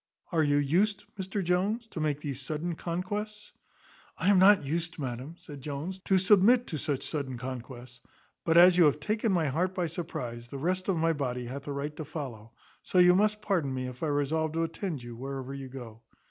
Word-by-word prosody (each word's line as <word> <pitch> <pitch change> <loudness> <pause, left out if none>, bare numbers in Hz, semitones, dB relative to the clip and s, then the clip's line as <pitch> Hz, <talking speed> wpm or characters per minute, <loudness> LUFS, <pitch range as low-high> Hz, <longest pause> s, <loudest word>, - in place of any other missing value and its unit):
Are 165 -2 +2
you 145 -1 +3
used, 180 +9 +2
Mr 195 +1 -3
Jones, 195 +7 0
to 165 - -6
make 150 -2 -1
these 140 -3 -4
sudden 155 +5 -3
conquests?" 205 +6 -4 0.7
"I 190 - +1
am 195 - +5
not 195 -4 +6
used, 170 +4 -2
madam," 130 +2 -5
said 145 -5 -11
Jones, 150 +7 -5
"to 190 - +4
submit 210 +6 +5
to 155 - -4
such 140 -2 -2
sudden 140 -5 -3
conquests; 125 0 -8 0.4
but 165 0 +3
as 175 +1 +8
you 170 - +8
have 145 - +3
taken 215 +1 0
my 170 -4 +2
heart 180 +7 0
by 180 -2 0
surprize, 125 -8 -5
the 140 - -7
rest 185 +6 -1
of 185 - +2
my 165 +1 +2
body 125 -4 -3
hath 135 +4 -7
a - - -2
right 140 +2 -4
to 155 - -4
follow; 130 -8 -7 0.3
so - - -2
you 180 0 +8
must 210 +2 +2
pardon 175 -10 0
me 130 0 -3
if 125 0 -8
I 160 - 0
resolve 150 +2 0
to 165 +1 0
attend 165 -4 -4
you 120 -1 -8
wherever 135 +1 -5
you 135 -1 -7
go." 120 -4 -9
155 Hz, 205 wpm, -29 LUFS, 135-185 Hz, 0.7 s, as